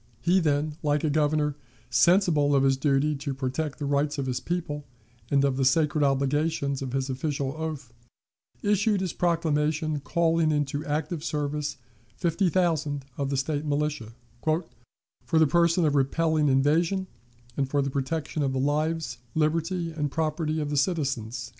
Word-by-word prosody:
He 175 +9 +3
then, 150 -2 0
like 150 -1 +1
a 155 - +1
Governor, 150 -1 +1 0.4
sensible 150 - +4
of 135 - +3
his 135 0 +4
duty 140 +2 +1
to 140 -1 -4
protect 135 +3 -3
the 145 - -4
rights 145 +1 0
of 140 - -2
his 125 -1 -2
people 165 -4 -3 0.5
and 140 -1 +3
of 135 -2 0
the 135 - +1
sacred 150 +3 +3
obligations 140 +1 0
of 130 -2 -4
his 135 -1 -1
official 135 0 -2
oath, 155 -6 -5 0.7
issued 205 0 +2
his 185 -3 -2
proclamation 155 -3 0
calling 165 +1 +1
into 145 -1 -1
active 155 +2 -2
service 150 -1 -2 0.4
fifty 175 +2 +1
thousand 155 -6 0
of 140 -1 -2
the 140 - -1
State 145 +2 -1
militia, 145 -6 -2 0.3
"for 160 +3 +1 0.7
the 160 - +6
purpose 170 +3 +3
of 160 -5 +3
repelling 150 +2 +2
invasion, 165 +8 +2 0.5
and 135 -2 -1
for 145 0 +1
the 135 - -2
protection 145 +3 -2
of 135 -2 0
the 130 - -1
lives, 155 +3 -1 0.2
liberty, 165 +2 0
and 150 -2 -2
property 155 +1 -1
of 150 -1 -2
the 145 - 0
citizens." 135 - -1
150 Hz, 160 wpm, -26 LUFS, 140-160 Hz, 0.7 s, the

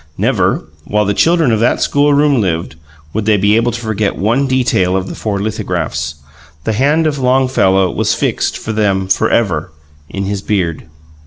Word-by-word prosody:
Never, - - +1 0.2
while 105 0 0
the 100 - 0
children 165 - +3
of 110 - +1
that 120 - +2
schoolroom 145 -2 +2
lived, 85 -4 -2 0.4
would 110 -1 -2
they 105 -1 +3
be 100 +2 +3
able 115 +2 +2
to 115 - -5
forget 110 -3 -2
one 120 +8 +1
detail 120 -8 +1
of 95 0 -3
the - - -6
four 105 -2 -3
lithographs: 75 -8 -3 0.5
the 110 - -1
hand 145 +8 +2
of 150 -2 -1
Longfellow 125 -8 +2
was - - 0
fixed, - - -1
for 110 - -5
them, 100 -3 0
forever, 100 -1 +1 0.4
in 100 - -4
his 100 0 -3
beard. 90 -7 -2
110 Hz, 170 wpm, -15 LUFS, 95-130 Hz, 0.5 s, children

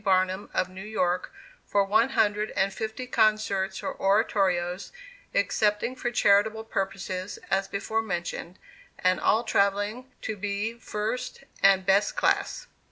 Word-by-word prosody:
Barnum, 185 0 +1
of 185 - 0
New 185 +1 -10
York, 185 -4 -1 0.3
for 200 - +2
one 220 +5 +3
hundred 210 -4 +1
and 195 0 +2
fifty 220 +5 -4
concerts 215 -5 +1
or - - -2
oratorios, 195 -3 +1 0.4
excepting 210 +4 +1
for 245 - -2
charitable 220 -1 +3
purposes 195 -2 -3
as 195 +1 +2
before 215 +3 -1
mentioned; 175 -3 -4 0.4
and 185 -2 +2
all 220 +8 +3
travelling 205 +5 0
to 220 - -3
be 205 +2 -2
first 235 +3 -4 0.2
and 195 -1 +5
best 200 +2 +3
class. - - 0
200 Hz, 130 wpm, -27 LUFS, 190-220 Hz, 0.4 s, and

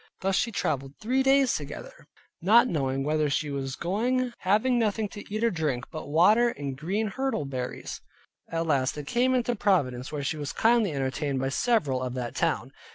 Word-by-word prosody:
Thus 195 0 +1
she 230 +4 +1
traveled 135 - -2
three 255 +5 +1
days 270 -1 +4
together, 145 -1 -7 0.3
not 220 +8 +6
knowing 135 - -1
whither 150 +1 +1
she 145 +1 -1
was 135 -1 -3
going; 245 +7 0
having 220 +6 +2
nothing 215 -1 0
to 205 - -9
eat 215 +2 -2
or 230 - +3
drink 150 -8 -1
but 155 - -6
water, 205 +11 +5
and 140 - -5
green 195 +10 -2
hirtle 265 - -1
berries. 130 -2 -5 0.5
At 165 0 -1
last 135 -5 +1
they 150 - -5
came 250 - +1
into 245 -1 0
Providence, 135 - +1
where 145 -2 -3
she 155 +3 -2
was 145 -1 -4
kindly 225 -4 +3
entertained 135 0 -2
by 135 +1 -1
several 140 - +1
of 125 -1 -3
that 120 -2 -4
town. - - -1
165 Hz, 185 wpm, -27 LUFS, 140-230 Hz, 0.5 s, not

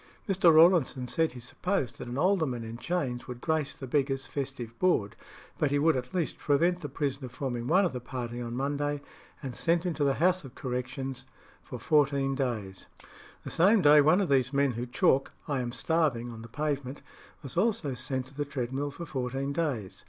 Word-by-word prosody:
Mr. 185 -4 +5
Rawlinson 160 -6 +5
said 160 +3 0
he 125 - -9
supposed 125 - -2
that - - -6
an 120 +2 -5
alderman 155 -8 +1
in 115 0 -7
chains 130 -5 -2
would 125 -1 -7
grace 155 -1 -1
the 135 - -7
beggars' 135 0 0
festive 135 -5 -5
board, 170 - +2 0.4
but 150 - +2
he 145 - +1
would 160 +2 +3
at 125 0 -4
least 170 -4 -1
prevent 170 +5 +2
the 145 - -5
prisoner 135 -1 -3
forming 125 -1 -4
one 185 +6 +4
of 175 - -1
the 125 - -3
party 120 -1 -5
on 120 0 -4
Monday, 145 +2 -1 0.4
and 130 -3 -5
sent 170 +1 +1
him 175 - 0
to 150 - -1
the 140 -1 +2
House 180 +2 +2
of 130 -3 -11
Correction 130 +1 -3 0.5
for - - -8
fourteen 140 -2 +2
days. 115 -8 -3 0.6
The - - -6
same 195 +4 +4
day 150 0 +8
one 155 +7 +4
of 190 - -1
those 130 -2 +3
men 140 -1 +2
who 120 +1 -4
chalk 130 +2 +2
"I 140 -3 0
am 120 -1 -3
starving" 130 -3 0
on 115 -1 -9
the 115 - -10
pavement 140 0 -3 0.4
was 135 - -7
also 180 - +1
sent 125 +1 -3
to 130 - -15
the 145 +1 -2
treadmill 135 0 -3
for 170 +4 -7
fourteen 135 0 -3
days. 140 - -2
140 Hz, 195 wpm, -29 LUFS, 125-155 Hz, 0.6 s, day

